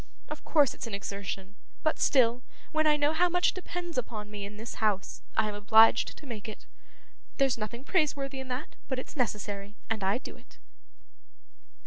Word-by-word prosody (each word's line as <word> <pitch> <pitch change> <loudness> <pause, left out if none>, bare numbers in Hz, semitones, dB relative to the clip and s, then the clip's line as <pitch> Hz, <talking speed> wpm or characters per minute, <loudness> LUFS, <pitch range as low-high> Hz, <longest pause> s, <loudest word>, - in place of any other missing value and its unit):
Of - - -6
course 295 -5 +4
it's - - -6
an 215 - -3
exertion, 200 -1 -5 0.3
but 310 - +1
still, 245 -3 +4 0.3
when 310 0 +3
I 300 -1 +5
know 295 +1 +2
how 355 +2 +3
much 355 0 +3
depends 350 -4 -3
upon 215 -3 -6
me 205 -1 -5
in 205 +1 -9
this 225 +2 -7
house, 205 -3 0 0.2
I 220 - +4
am 210 - -3
obliged 220 +3 +5
to - - -12
make 225 -5 -6
it. 215 - -10 0.7
There's 270 -3 +3
nothing 235 +3 -5
praiseworthy 280 -5 0
in 265 - -6
that, 255 +4 -5
but 260 - -2
it's 255 - -7
necessary, 205 -5 -2 0.2
and 220 -3 0
I 195 +4 +2
do 260 - -9
it. - - -19
235 Hz, 180 wpm, -30 LUFS, 210-290 Hz, 0.7 s, I